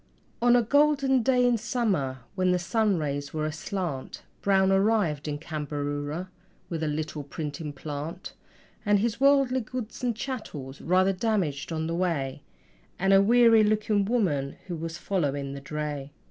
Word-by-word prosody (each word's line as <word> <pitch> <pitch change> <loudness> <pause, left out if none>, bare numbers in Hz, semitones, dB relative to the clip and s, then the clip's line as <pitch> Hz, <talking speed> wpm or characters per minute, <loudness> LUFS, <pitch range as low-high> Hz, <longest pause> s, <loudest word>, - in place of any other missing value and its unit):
On 240 0 +5
a 240 - +4
golden 275 0 +3
day 250 +1 +3
in 240 -2 +2
summer, 200 - -1
when 185 -1 +1
the 180 - +3
sunrays 170 - -1
were 155 0 -1
aslant, 155 -2 -4 0.2
Brown 190 -1 +3
arrived 195 -7 +2
in 145 -1 -2
Cambaroora 145 +1 -4 0.4
with 165 -2 -3
a 160 - 0
little 150 0 -3
printing 145 +1 -5
plant 150 +6 -6 0.5
And 205 -1 +4
his 225 +3 -1
worldly 275 -2 +4
goods 240 +1 -6
and 240 -2 0
chattels 190 - -6
rather 185 +3 +3
damaged 180 -9 -1
on 160 -1 -2
the 165 - -2
way 155 -7 -1 0.6
And 195 +1 +3
a 195 - +7
weary 230 +1 +6
looking 210 -1 +2
woman 175 - 0
who 180 -2 -4
was 165 +1 -5
following 145 -8 -1
the 140 - -7
dray. 145 -1 -4
180 Hz, 150 wpm, -27 LUFS, 150-220 Hz, 0.6 s, a